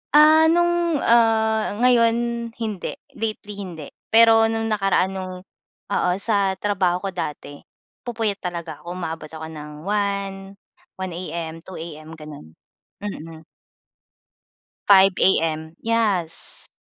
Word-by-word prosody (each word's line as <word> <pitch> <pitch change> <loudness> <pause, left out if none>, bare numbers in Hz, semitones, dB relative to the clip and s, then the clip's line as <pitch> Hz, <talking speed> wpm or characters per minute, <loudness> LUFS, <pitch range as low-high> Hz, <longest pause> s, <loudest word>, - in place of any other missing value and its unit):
Ah, 310 +1 +7
nung, 345 -2 +2
ah, 220 -2 +3
ngayon 235 -2 +5 0.4
hindi, 215 -5 -4 0.2
lately 215 -2 -4
hindi. 170 -7 -7 0.2
Pero 225 0 +6
nung 225 0 -2
nakaraan 195 -2 +2
nung, 185 -1 -5 0.6
oo, 190 - +1
sa 200 -1 +1
trabaho 190 -2 0
ko 195 - -1
dati 150 -5 -6 0.5
nagpupuyat 220 -4 -1
talaga 170 -4 -5
ako, 175 +1 -7
umaabot 160 -3 -5
ako 160 0 -8
ng 150 -1 -9
1, 200 0 -1 0.6
1 190 -1 -5
AM, 165 -1 -5
2 185 +2 -11
AM, 160 -1 -8
gano'n. 150 - -11 0.5
Mm. 165 -5 -7 1.4
5 195 -1 +7
AM, 160 -3 +1
yes! 210 -8 0
195 Hz, 115 wpm, -22 LUFS, 165-225 Hz, 1.4 s, Ah